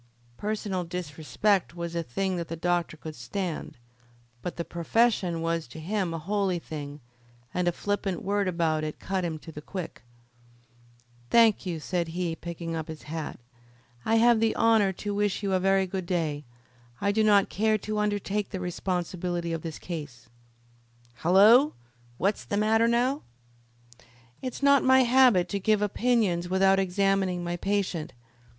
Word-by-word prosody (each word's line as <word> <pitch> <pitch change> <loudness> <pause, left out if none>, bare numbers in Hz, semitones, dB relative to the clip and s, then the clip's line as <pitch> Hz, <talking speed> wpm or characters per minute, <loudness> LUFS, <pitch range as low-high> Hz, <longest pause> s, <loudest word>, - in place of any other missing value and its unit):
Personal 205 -3 -2
disrespect 175 +3 -1
was 170 -1 -5
a 170 - -1
thing 185 +7 -2
that 170 -1 -4
the 165 - -4
doctor 175 -1 -1
could 155 0 -8
stand; 165 +8 -4 0.6
but 180 - -5
the 170 - -4
profession 175 -1 +1
was 165 -3 -1
to 125 - -10
him 185 +2 -1
a 165 - -3
holy 190 +2 0
thing, 145 -3 -7 0.5
and 180 -1 0
a - - +4
flippant 200 0 -2
word 200 0 0
about 165 -3 0
it 155 -1 -4
cut 190 -1 -2
him 165 -2 -2
to 160 +1 -11
the 150 - -8
quick. 180 +2 -7 1.3
"Thank 225 - +4
you," 170 -3 -3
said 175 +2 -2
he, 170 0 -2
picking 170 0 -6
up 160 -1 -4
his 160 -1 -8
hat. 155 -2 -5 0.6
"I 225 - +2
have 235 0 +5
the 225 0 +2
honour 225 -4 +4
to 205 +3 -4
wish 205 0 0
you 195 -1 0
a 185 - +3
very 195 +1 +3
good 185 -1 -4
day. 155 -5 -1 0.5
I 200 - +1
do 220 +1 +2
not 205 -2 +4
care 215 +1 +2
to 215 +1 -3
undertake 205 0 -1
the 190 - -5
responsibility 175 -1 -2
of 165 - -3
this 160 -2 -6
case." 145 -10 -7 0.9
"Hullo! 210 - +6 0.4
what's 200 +3 0
the 205 - -2
matter 220 +2 +3
now?" 250 +5 +1 1.2
"It 255 -2 -4
is - - -8
not 280 -1 +5
my 260 0 +6
habit 240 -7 +5
to 200 - -2
give 210 +1 +2
opinions 205 -5 +1
without 195 +1 +4
examining 190 -1 +1
my 175 0 -2
patient. 180 -3 -2
185 Hz, 160 wpm, -27 LUFS, 170-205 Hz, 1.3 s, Hullo